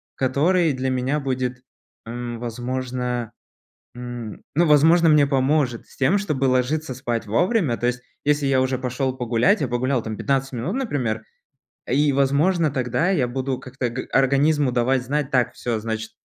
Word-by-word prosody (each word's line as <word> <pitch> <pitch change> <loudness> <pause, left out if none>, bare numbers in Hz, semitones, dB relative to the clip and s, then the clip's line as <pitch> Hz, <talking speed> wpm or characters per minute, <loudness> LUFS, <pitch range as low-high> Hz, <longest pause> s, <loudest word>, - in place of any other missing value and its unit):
который 155 +6 +2
для 130 0 -2
меня 130 +3 0
будет, 130 -2 -3 0.4
м, 120 0 -5
возможно 125 0 -3 0.6
м, 120 -3 -7
ну, 170 +3 +4
возможно, 160 +3 +5
мне 150 -2 +5
поможет 135 -2 +1
с - - -19
тем, 140 +9 +3
чтобы 150 -9 -1
ложиться 130 +3 0
спать 120 -3 -3
вовремя. 150 - +1
То 120 - -1
есть, 125 0 -2 0.2
если 145 0 +2
я 135 -1 +3
уже 130 0 0
пошел 130 +1 -2
погулять, 125 - +2
я 140 - 0
погулял 125 0 0
там 110 -1 -5
15 135 -1 -1
минут, 130 - -3
например, 130 - -2 0.7
и, 145 +3 +3
возможно, 150 +5 +2
тогда 130 +5 0
я 140 -10 +1
буду 130 +1 -2
как-то 130 -1 -4
г 125 +2 -6
организму 140 +1 +3
давать 125 +1 +1
знать, 145 +2 -2
так, 125 -2 +2
всё, 115 -2 -3
значит, 110 0 -4
130 Hz, 160 wpm, -22 LUFS, 120-145 Hz, 0.7 s, возможно